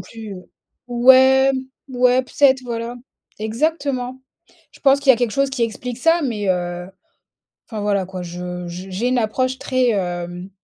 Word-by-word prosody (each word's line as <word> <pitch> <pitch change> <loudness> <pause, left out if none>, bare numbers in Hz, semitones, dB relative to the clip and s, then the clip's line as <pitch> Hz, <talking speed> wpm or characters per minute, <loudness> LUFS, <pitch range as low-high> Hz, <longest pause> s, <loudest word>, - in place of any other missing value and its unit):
plus, 215 +2 -9
heu 180 -1 -13 0.4
ouais, 260 +2 +6 0.4
ouais, 250 0 +3
peut 250 - -18
être, 265 -2 +5
voilà. 235 0 -4 0.4
Exactement. 255 +2 -2 0.5
Je - - -19
pense 275 0 +4
qu'il 280 -1 +5
y - - +10
a - - -5
quelque 240 -2 -1
chose 275 0 +1
qui 265 -3 -2
explique 235 +2 -3
ça, 330 +5 +3
mais, 210 -7 -2
heu, 175 -1 -2 0.8
enfin 215 -3 -6
voilà 200 -2 0
quoi 185 -1 -7
je 180 0 -6
j 180 +2 -8
j'ai 220 +7 -1
une 255 -1 +1
approche 255 +4 -1
très, 255 -2 +1
hem, 175 -2 -3
235 Hz, 170 wpm, -20 LUFS, 190-260 Hz, 0.8 s, y